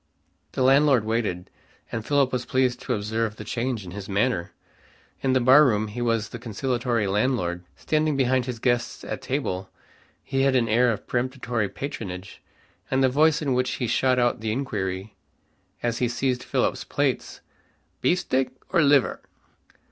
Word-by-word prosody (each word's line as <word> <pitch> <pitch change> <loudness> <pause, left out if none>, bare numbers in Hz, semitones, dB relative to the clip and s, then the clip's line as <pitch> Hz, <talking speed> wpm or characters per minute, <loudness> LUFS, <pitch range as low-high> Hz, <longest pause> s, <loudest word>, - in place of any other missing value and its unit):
The 130 - 0
landlord 135 -3 +5
waited, 110 -6 -2 0.4
and 115 -2 -3
Philip 140 0 +2
was 125 -1 -1
pleased 130 -1 +1
to - - -1
observe 110 +1 -2
the 110 - -8
change 120 -1 -3
in 90 - -8
his 100 +1 -7
manner. 100 -3 0 0.7
In 130 -1 +1
the 130 - +4
barroom 125 -4 +5
he 120 +4 -5
was 115 -2 0
the 120 - -8
conciliatory 120 0 -1
landlord. 95 -4 0
Standing 155 -1 0
behind 130 -1 +2
his 125 -2 -3
guests 120 0 -1
at - - -5
table, 95 -9 -3 0.5
he 135 - -1
had 135 -1 +3
an 120 -3 +3
air 120 +3 +3
of 105 - -5
peremptory 120 -4 -1
patronage, 100 -9 -7 0.5
and 130 0 +2
the 130 - +5
voice 155 +4 +3
in 135 -3 +1
which 125 0 0
he 125 - -2
shot 125 +2 +2
out 120 -2 +2
the 110 0 -2
inquiry, 105 -6 -3 0.7
as 120 -1 -1
he 125 - +2
seized 125 +1 -1
Philip's - - -1
plate, - - -1 0.6
"Beefsteak 135 -7 +1 0.2
or 170 - +3
liver?" 140 -2 +3
125 Hz, 160 wpm, -25 LUFS, 110-130 Hz, 0.7 s, landlord